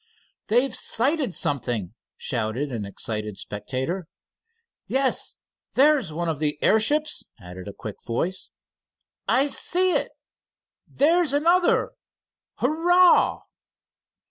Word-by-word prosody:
"They've 245 +5 +2
sighted 265 - 0
something," 120 -9 -1 0.2
shouted 120 +4 -3
an 110 -4 -4
excited 105 +1 -4
spectator. 130 - -4 0.8
"Yes, 265 0 0 0.4
there's 280 - +3
one 170 +2 -3
of 160 -3 -2
the 150 -1 -1
airships," 295 +8 +2 0.2
added 90 +1 -10
a - - -5
quick 105 0 -8
voice. 170 +11 -3 0.8
"I 265 +2 +4
see 360 +6 +1
it!" - - 0 0.8
"There's 325 0 +2
another!" 340 +5 +3 0.6
"Hurrah!" 345 +6 +3
190 Hz, 95 wpm, -24 LUFS, -, 0.8 s, I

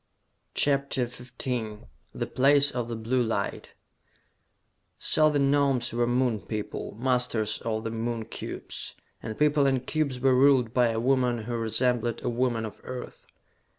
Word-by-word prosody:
CHAPTER 140 -3 +1
XV 120 -3 -5 0.3
The - - -3
Place 140 +1 +4
of 120 -2 -3
the 120 - -4
Blue 115 +3 0
Light 110 -4 -2 1.2
So 155 0 +4
the 150 - +1
Gnomes 140 -3 +2
were 120 0 +1
Moon 120 -2 +1
people, 105 -1 -5
masters 125 -4 0
of 110 -1 -2
the 115 - -3
Moon 115 0 -3
cubes! - - -7 0.3
And 110 -1 -6
people 150 -1 +3
and 130 -2 0
cubes 140 -4 -1
were 130 +1 +4
ruled 130 -3 +4
by 125 -2 +4
a 110 0 -1
woman 125 -2 +1
who 120 +2 -5
resembled 115 +1 0
a - - 0
woman 120 -2 0
of 110 - -9
Earth! 130 -1 -8
125 Hz, 150 wpm, -27 LUFS, 115-135 Hz, 1.2 s, Place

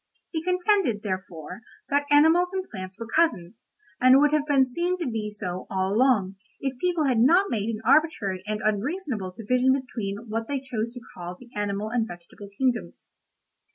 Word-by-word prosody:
He 320 - -2
contended, 360 - +1
therefore, 185 -2 -5 0.3
that 285 0 +1
animals 320 +5 +5
and 380 -1 -3
plants 185 -1 -7
were 230 - -5
cousins, 225 - 0 0.3
and 255 +1 +7
would 295 +1 +4
have 300 -1 +1
been 275 -3 +4
seen 345 +8 -1
to 345 - -3
be 220 -4 -2
so, 185 -4 -6
all 190 0 0
along, 215 -6 +2 0.2
if 270 -2 -3
people 350 -1 +1
had 255 -4 +2
not 345 - +4
made 215 -1 -1
an 220 -1 -3
arbitrary 255 - +2
and 215 0 -2
unreasonable 215 - -1
division 255 +4 +2
between 225 -4 -5
what 225 +1 -3
they 280 -1 -1
chose 235 -4 -3
to 245 - -8
call 175 0 -7
the 245 -1 -15
animal 205 0 -2
and 230 -2 0
vegetable 175 +3 -11
kingdoms. 255 -3 -2
235 Hz, 175 wpm, -26 LUFS, 205-290 Hz, 0.3 s, and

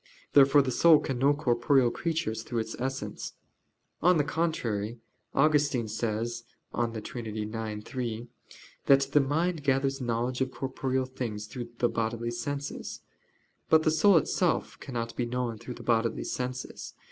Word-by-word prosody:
Therefore 140 0 +7
the 130 - -1
soul 165 +5 +7
can 130 -3 -3
know 140 +3 +4
corporeal 125 -2 +3
creatures 160 -10 -2
through 120 +1 -5
its 110 0 -2
essence. 135 +1 -4 0.7
On 180 +1 +5
the 150 - +3
contrary, 120 -9 -1 0.4
Augustine 145 -5 +3
says 115 +2 -2 0.3
(De 115 -2 -1
Trin. 115 +1 -6
ix, 110 0 -4
3) 120 -2 -4 0.6
that 140 0 +7
"the 145 - +5
mind 155 +4 0
gathers 135 0 +1
knowledge 120 +1 -1
of 130 - +1
corporeal 130 0 -2
things 120 -5 -5
through 120 +2 -7
the 120 - +3
bodily 115 +1 -2
senses." 140 +4 -4 0.7
But 160 0 +6
the 155 - +3
soul 175 +4 +5
itself 155 - +1
cannot 115 -3 -4
be 120 - -1
known 120 -2 -2
through 120 +2 -7
the - - -10
bodily 115 -1 +1
senses. 125 0 -5
125 Hz, 145 wpm, -29 LUFS, 115-140 Hz, 0.7 s, Therefore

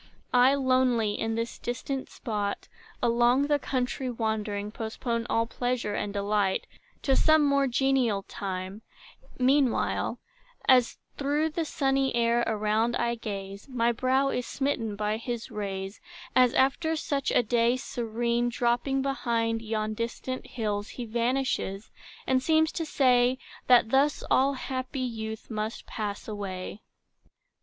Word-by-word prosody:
I, 250 +2 +6
lonely, 255 -5 +2
in 225 +1 -2
this 230 +1 -3
distant 260 +2 -4
spot, 205 -4 -3 0.4
Along 240 +3 +4
the 290 0 +2
country 255 -1 -2
wandering, 215 -3 -2
Postpone 230 +1 -3
all 230 0 +2
pleasure 245 -2 -2
and 205 - -2
delight 200 -1 0 0.4
To 270 - +3
some 310 0 +5
more 280 -1 +3
genial 250 -5 +1
time: 190 +1 -5 0.6
meanwhile, 260 0 +2 0.5
As 255 -2 +5 0.2
through 295 +3 0
the 325 +1 -2
sunny 270 -3 +1
air 235 0 +3
around 220 +2 +1
I 235 0 0
gaze, 200 -1 -6
My 240 -2 +2
brow 260 +3 +2
is 250 -3 -2
smitten 245 -7 -1
by 210 +1 -1
his 235 0 -5
rays, 195 -1 -5 0.3
As 250 -1 +5
after 320 +5 +2
such 285 -3 -1
a - - +3
day 235 +2 +2
serene, 235 0 -1
Dropping 245 +3 0
behind 230 -4 0
yon 215 -1 -2
distant 235 +3 -4
hills, 210 -3 -2
He 245 - -6
vanishes, 235 -3 -1 0.3
and 260 0 +2
seems 315 +2 +3
to 325 - -3
say, 255 -3 +3 0.3
That 240 -3 +5
thus 280 +2 +3
all 275 +2 +4
happy 260 +1 -4
youth 220 -3 -5
must 215 +1 -3
pass 205 -2 -5
away. 200 -1 -5
240 Hz, 135 wpm, -28 LUFS, 220-265 Hz, 0.6 s, I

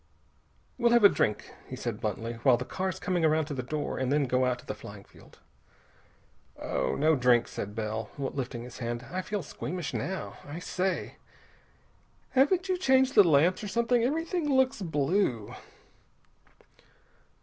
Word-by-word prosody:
"We'll 235 -1 +4
have 235 -2 +5
a 200 - +10
drink," 105 - -1
he - - -6
said - - -5
bluntly, 115 +1 -3
"while 130 -2 +5
the 125 - -5
car's 185 +5 -3
coming 180 -3 -1
around 155 0 +3
to 145 - -5
the 130 - -3
door, 145 +3 -3
and 130 0 -1
then 145 0 +3
go 130 0 +1
out 125 -1 0
to - - -16
the - - -4
flying 100 -1 -11
field." - - -19 1.2
"No 155 +2 +1
drink," 125 -2 +3
said 105 +1 -6
Bell, 110 0 -3
lifting 135 -3 -4
his 125 0 -10
hand. 120 0 -4
"I 185 +1 -2
feel 205 0 -4
squeamish 165 +3 -5
now. 190 +1 -4
I 145 +3 -8
say! 185 +2 -2 1.1
Haven't 345 +8 +3
you 370 -1 0
changed 265 -4 +3
the 205 - +8
lamps, 170 +4 +3
or - - -3
something? 235 +3 +1
Everything 325 +4 -1
looks 265 -3 +2
blue...." 150 - 0
155 Hz, 160 wpm, -29 LUFS, 125-210 Hz, 1.2 s, a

